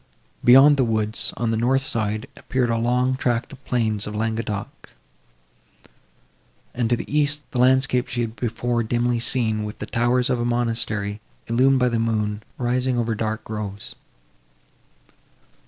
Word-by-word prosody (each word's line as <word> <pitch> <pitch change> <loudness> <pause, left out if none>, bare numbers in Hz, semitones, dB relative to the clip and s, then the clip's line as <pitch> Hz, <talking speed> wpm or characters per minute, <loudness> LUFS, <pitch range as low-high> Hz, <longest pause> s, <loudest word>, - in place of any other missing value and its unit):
Beyond 135 +4 +7
the 135 - +3
woods, 110 -2 -1
on 115 -1 0
the 110 - 0
north 130 +4 +2
side, 110 -4 -2
appeared 125 -3 -1
a 115 - +1
long 125 +2 +1
tract 120 0 -1
of 135 - -12
the 140 - -34
plains 110 -4 0
of 105 - -6
Languedoc; 110 -2 -4 1.8
and, 120 -2 -1
to 120 - +3
the - - -6
east, 150 0 +2
the 125 - -2
landscape 130 0 +3
she 120 -1 -2
had 115 -1 -3
before 120 0 -1
dimly 120 +1 0
seen, 115 -3 +1
with 105 0 -6
the - - -5
towers 120 +2 +1
of 125 - 0
a - - 0
monastery, 115 -3 -1 0.2
illumined 130 +3 +3
by 125 - +3
the 115 -1 -1
moon, 105 -2 -1 0.2
rising 125 +1 0
over 115 -1 0
dark 110 +1 -3
groves. 105 -2 -6
120 Hz, 155 wpm, -23 LUFS, 110-125 Hz, 1.8 s, Beyond